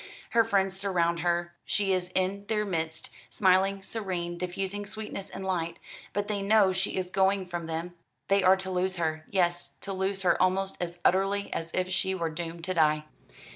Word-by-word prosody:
Her 230 0 +5
friends 195 -3 +1
surround 170 -4 +1
her; 175 0 0
she 195 -1 +1
is 180 -1 -1
in 195 +2 0
their 210 -1 +1
midst, 160 -4 -3 0.2
smiling, 195 0 +3
serene, 185 -6 -3
diffusing 190 +3 -3
sweetness 210 -1 -5
and 190 - -6
light; 170 -3 -1 0.3
but 205 0 -2
they 205 -2 -1
know 200 -1 +4
she 190 +1 -1
is 185 -1 -2
going 190 0 +2
from 175 -2 -5
them 165 +2 -4 0.3
they 195 0 +4
are 185 +1 +6
to 190 0 -3
lose 185 +1 0
her, 155 -2 -2
yes, 175 -2 +1
to 195 - -4
lose 195 +1 -1
her 180 - +3
almost 190 +1 +2
as 175 0 -3
utterly 195 +2 +2
as 165 - -3
if 185 0 0
she 190 +1 +1
were 165 -3 -2
doomed 165 +1 -6
to 185 +2 -1
die." 155 -3 +3
185 Hz, 185 wpm, -29 LUFS, 175-195 Hz, 0.3 s, are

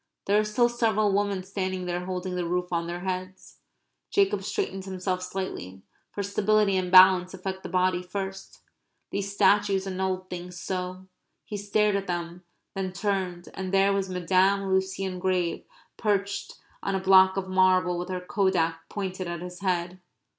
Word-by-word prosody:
There 205 +1 +3
are - - +2
still 240 +3 +2
several 220 -4 +1
women 200 -2 0
standing 185 -1 -3
there 175 0 -3
holding 185 0 -3
the 175 -1 -2
roof 180 +1 -2
on 170 0 0
their 175 +1 -5
heads. 185 0 -5 0.5
Jacob 395 -1 +2
straightened 195 - -3
himself 185 -1 -2
slightly; 180 - -5 0.3
for 200 - -3
stability 200 0 +2
and 185 -1 -1
balance 185 0 +7
affect 190 0 -5
the - - -7
body 185 0 +1
first. 190 +1 -6 0.5
These 200 0 -2
statues 200 -1 +3
annulled 185 -1 -2
things 180 0 -7
so! 185 +1 -4 0.4
He 210 - -6
stared 205 +1 +1
at 195 0 -2
them, 175 0 -4 0.3
then 190 -2 -3
turned, 185 -3 -2
and 190 -1 -5
there 195 0 +4
was 195 -1 -1
Madame 190 +2 +2
Lucien 190 -1 -1
Grave 180 -2 -1 0.3
perched 200 -2 -1 0.3
on 195 - -1
a - - +1
block 190 0 +6
of 190 -1 -2
marble 185 -1 +3
with 180 - -5
her 185 -1 -3
kodak 180 -4 0
pointed 185 -2 -4
at 170 -1 -4
his 180 0 -8
head. 180 -1 -2
190 Hz, 160 wpm, -27 LUFS, 180-195 Hz, 0.5 s, balance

